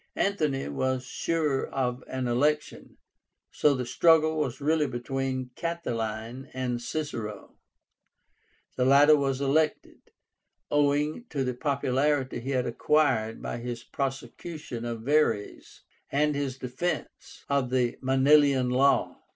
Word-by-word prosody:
Antony 155 -9 0
was 130 - -1
sure 150 -3 -1
of 125 -1 -2
an 130 -1 -3
election, 150 +5 -1 0.5
so 145 -2 +3
the 125 -1 -3
struggle 160 +3 +4
was 135 -3 -2
really 150 +1 +1
between 130 +1 -3
Catiline 120 -7 -4
and 125 -2 -2
Cicero. 115 -8 -5 1.2
The 125 - +2
latter 145 +3 +7
was 135 -2 -1
elected, 150 +3 0 0.6
owing 145 +8 +1
to 140 -2 -1
the 125 -1 -1
popularity 135 0 0
he 125 +3 -6
had 130 -2 0
acquired 115 -4 +1
by - - -3
his 120 -1 -5
prosecution 135 -1 -5
of 115 -1 -4
Verres 125 -6 0 0.3
and 150 +1 +2
his 140 -2 -3
defence 130 +8 -5
of 140 -3 +1
the 125 -2 0
Manilian 135 -1 +4
Law. 135 +2 +2
135 Hz, 120 wpm, -27 LUFS, 125-150 Hz, 1.2 s, latter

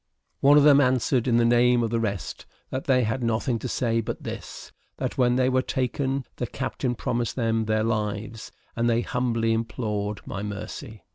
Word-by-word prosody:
One 145 +2 +6
of 145 - +6
them 145 -1 +7
answered 130 -1 +2
in 120 -2 +3
the 120 - +4
name 120 0 +4
of 115 - -1
the 115 - +1
rest, 100 -5 -4 0.2
that 130 - -3
they 130 -2 +3
had 115 +4 -1
nothing 115 +1 0
to 130 - -4
say 115 -2 0
but - - -5
this, - - -7 0.3
that - - -3
when 125 -1 +3
they 130 0 +2
were 130 0 +2
taken 130 +1 -2
the 125 - -2
captain 125 -1 -3
promised 120 0 -2
them 115 -2 0
their 110 0 +1
lives, 110 0 -3 0.2
and 120 +1 +1
they 115 0 +2
humbly 115 -2 0
implored 105 -3 -3
my 100 - -5
mercy. 105 +3 -7
120 Hz, 190 wpm, -25 LUFS, 110-125 Hz, 0.3 s, them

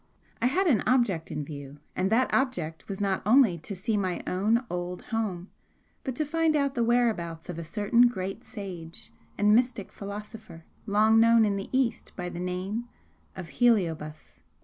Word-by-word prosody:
I 240 - +4
had 370 +10 +1
an 255 - +3
object 230 -11 +2
in 150 -1 -4
view, 140 -1 -9 0.2
and 185 +1 0
that 250 +3 +2
object 170 - -1
was 195 - -4
not 195 -2 0
only 220 -5 +4
to 195 +6 -7
see 210 +4 -1
my 185 -3 -2
own 220 +7 +1
old 180 -1 -4
home, 210 -6 -3 0.5
but 260 -3 -3
to 305 - -1
find 325 +1 +1
out 280 -2 +1
the 240 -4 0
whereabouts 215 -9 0
of 170 -2 -5
a - - -4
certain 210 +7 +3
great 195 0 -4
sage 180 -6 -9 0.2
and 210 +1 +4
mystic 240 -3 +1
philosopher 210 -3 -9 0.2
long 215 +2 +4
known 230 0 +6
in 205 -1 0
the 195 0 -5
East 255 -3 0
by 180 -1 -4
the 175 - -7
name 185 +6 -3 0.5
of 165 - -7
Heliobas." 165 -10 +1
205 Hz, 170 wpm, -27 LUFS, 180-240 Hz, 0.5 s, known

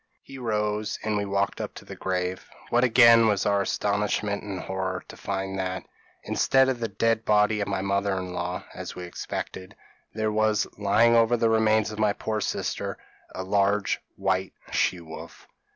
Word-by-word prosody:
p> - - -13
"He - - -7
rose 105 -2 -1
and 110 0 0
we 100 0 0
walked 100 0 -1
up - - -6
to - - -11
the - - -8
grave; 90 -1 -3 0.2
what 120 +1 +4
again 115 -2 +7
was 105 -2 +1
our 100 -1 +3
astonishment 100 +1 0
and 100 -3 -5
horror 95 0 -3
to - - -9
find 95 0 -3
that, 95 0 -3 0.4
instead 130 0 +3
of 130 -2 -1
the 115 - -1
dead 115 +2 +1
body 105 0 +3
of 100 - -1
my 100 -2 -1
mother 100 0 0
in 90 -1 -5
law, 90 +1 -3
as - - -7
we 90 - -6
expected, 95 +2 -6 0.4
there 110 0 -1
was 110 0 +2
lying 105 +3 +4
over 115 +1 +4
the 115 -1 +2
remains 110 -1 +3
of 105 - -7
my 105 -2 +3
poor 110 0 -3
sister, - - -2 0.4
a 95 - -3
large 100 +1 +1
white 95 0 -1 0.2
she 90 - +1
wolf. 80 0 -11
105 Hz, 185 wpm, -26 LUFS, 95-110 Hz, 0.4 s, again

